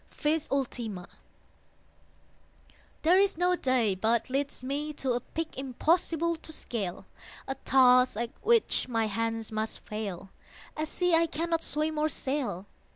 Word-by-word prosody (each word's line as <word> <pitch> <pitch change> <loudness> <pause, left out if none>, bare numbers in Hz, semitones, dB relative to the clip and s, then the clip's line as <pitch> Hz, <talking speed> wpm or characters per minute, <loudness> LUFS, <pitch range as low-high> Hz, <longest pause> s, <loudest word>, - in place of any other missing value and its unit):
VIS 310 +1 0
ULTIMA 235 -9 -3 2.0
There 350 +4 +5
is 395 -3 +2
no 360 +1 +3
day 255 - +2
but 225 +6 0
leads 275 -1 -2
me 290 +3 -3
to 270 -3 -1
A 240 - +1
peak 325 +6 -5
impossible 330 +5 +1
to 315 - -4
scale, 210 - -4 0.4
A 270 - -1
task 255 -3 +4
at 235 +1 -2
which 460 - +3
my 225 -3 0
hands 225 +1 -2
must 215 0 -3
fail, 195 -3 -6 0.4
A 310 0 -2
sea 355 +2 0
I 330 0 +4
cannot 330 +1 -1
swim 305 +1 0
or 310 +1 +2
sail. 265 - -3
270 Hz, 140 wpm, -29 LUFS, 225-315 Hz, 2.0 s, There